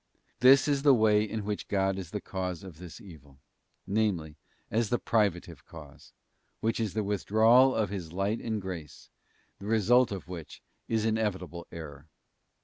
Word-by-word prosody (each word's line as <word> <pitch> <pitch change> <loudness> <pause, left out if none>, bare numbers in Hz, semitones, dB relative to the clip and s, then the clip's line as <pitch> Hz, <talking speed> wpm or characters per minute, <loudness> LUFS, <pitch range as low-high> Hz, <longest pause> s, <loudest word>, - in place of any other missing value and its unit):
This 130 +3 +6
is 140 -2 +1
the 140 -2 +6
way 110 -2 +4
in 110 -1 -4
which 105 0 -4
God 95 -1 0
is 90 -4 -7
the 105 - -4
cause 90 -3 -5
of 90 -5 -11
this 90 -3 -10
evil; 75 -8 -15 0.5
namely, 95 -7 -1 0.4
as 110 0 +1
the 120 - +2
privative 90 - -1
cause, 75 -4 -13 0.5
which 115 +1 -1
is 110 -3 -2
the 110 - 0
withdrawal 110 +6 +4
of 105 -3 0
His 90 -5 -5
light 100 +5 -1
and 110 -2 -2
grace, 90 -6 -8 0.5
the 100 - -8
result 115 +3 +3
of 95 -2 -6
which 85 -4 -9 0.2
is 110 -1 0
inevitable 95 -6 -2
error. 75 -2 -9
100 Hz, 160 wpm, -29 LUFS, 85-110 Hz, 0.5 s, This